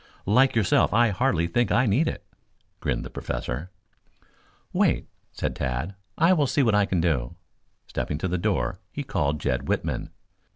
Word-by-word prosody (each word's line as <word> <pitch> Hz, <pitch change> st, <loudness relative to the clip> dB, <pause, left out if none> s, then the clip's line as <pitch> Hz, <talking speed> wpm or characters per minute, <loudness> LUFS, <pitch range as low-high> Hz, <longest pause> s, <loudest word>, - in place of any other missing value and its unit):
"Like 130 Hz, +6 st, +4 dB
yourself 105 Hz, -1 st, +3 dB
I 120 Hz, 0 st, +5 dB
hardly 100 Hz, -5 st, +1 dB
think 120 Hz, +8 st, +1 dB
I 130 Hz, -, +4 dB
need 125 Hz, +10 st, +2 dB
it," -, -, -4 dB, 0.5 s
grinned -, -, -2 dB
the -, -, -8 dB
Professor. 60 Hz, +7 st, -4 dB, 1.0 s
"Wait," -, -, +2 dB, 0.2 s
said -, -, -3 dB
Tad. 65 Hz, +9 st, -2 dB, 0.2 s
"I 165 Hz, +3 st, +5 dB
will 150 Hz, -6 st, +2 dB
see 140 Hz, -, +2 dB
what 115 Hz, -3 st, +3 dB
I 105 Hz, -1 st, +3 dB
can 90 Hz, -3 st, +1 dB
do." 70 Hz, -8 st, 0 dB, 0.5 s
Stepping 75 Hz, -, -3 dB
to 85 Hz, -, -2 dB
the 90 Hz, 0 st, -1 dB
door 100 Hz, +1 st, 0 dB
he -, -, -4 dB
called 70 Hz, +1 st, 0 dB
Jed 70 Hz, -2 st, -1 dB
Whitman. -, -, -1 dB
95 Hz, 165 wpm, -25 LUFS, 75-120 Hz, 1.0 s, I